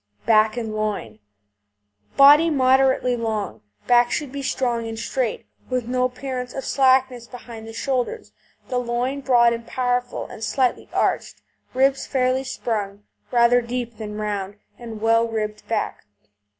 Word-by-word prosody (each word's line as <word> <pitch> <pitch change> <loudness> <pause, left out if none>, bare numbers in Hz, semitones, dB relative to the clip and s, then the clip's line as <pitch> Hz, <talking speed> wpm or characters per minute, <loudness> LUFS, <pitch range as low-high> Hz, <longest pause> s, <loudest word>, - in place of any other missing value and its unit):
BACK 215 0 +4
AND 225 -2 -3
LOIN 210 - -3 1.0
Body 290 +4 +8
moderately 260 -3 +3
long; 215 - -3 0.2
back 240 0 +4
should 290 -1 -3
be 280 0 -5
strong 240 -4 -1
and 225 0 -6
straight, 235 0 -2 0.2
with 250 -2 -1
no 250 +1 0
appearance 250 0 -5
of 270 - -5
slackness 260 -3 +2
behind 235 -3 -10
the 225 - -9
shoulders; 265 - -2 0.4
the 250 - -1
loin 245 +3 -2
broad 240 -3 +4
and 230 0 -6
powerful, 245 -1 -1
and 220 - -10
slightly 245 +3 0
arched; - - -1 0.3
ribs 270 +1 +2
fairly 255 0 +1
sprung, 205 -6 -4 0.3
rather 240 0 +4
deep 235 -1 -5
than 210 -1 -6
round, 205 -2 -3 0.2
and 225 -3 -8
well 230 +1 +3
ribbed 215 -2 -4
back. 225 - -2
240 Hz, 140 wpm, -22 LUFS, 225-255 Hz, 1.0 s, Body